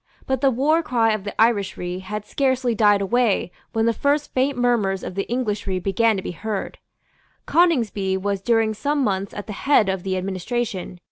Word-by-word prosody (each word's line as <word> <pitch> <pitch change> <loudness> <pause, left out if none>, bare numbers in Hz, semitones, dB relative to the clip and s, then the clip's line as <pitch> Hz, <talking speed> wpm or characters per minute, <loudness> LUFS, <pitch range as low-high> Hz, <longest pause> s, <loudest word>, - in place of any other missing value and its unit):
But 265 -1 -1
the 275 - +4
war 285 +6 +2
cry 230 -7 +1
of 210 -2 -4
the 205 - -5
Irishry 200 -5 +1
had 210 +2 -5
scarcely 260 -3 0
died 205 -2 +4
away 220 -2 +1 0.2
when 225 -1 +1
the 230 - +3
first 285 +5 0
faint 265 +1 +1
murmurs 220 -6 +1
of - - -5
the 195 +1 -3
Englishry 210 -6 -1
began 205 +4 +1
to 190 - -4
be - - -4
heard. 210 +3 -5 0.7
Coningsby 230 - +2
was 200 0 -2
during 225 0 +2
some 285 +6 -1
months 195 -3 -1
at 205 - -7
the 210 - -6
head 225 -3 +3
of 190 -1 -1
the 190 0 -2
administration. 190 0 -3
215 Hz, 185 wpm, -22 LUFS, 195-245 Hz, 0.7 s, the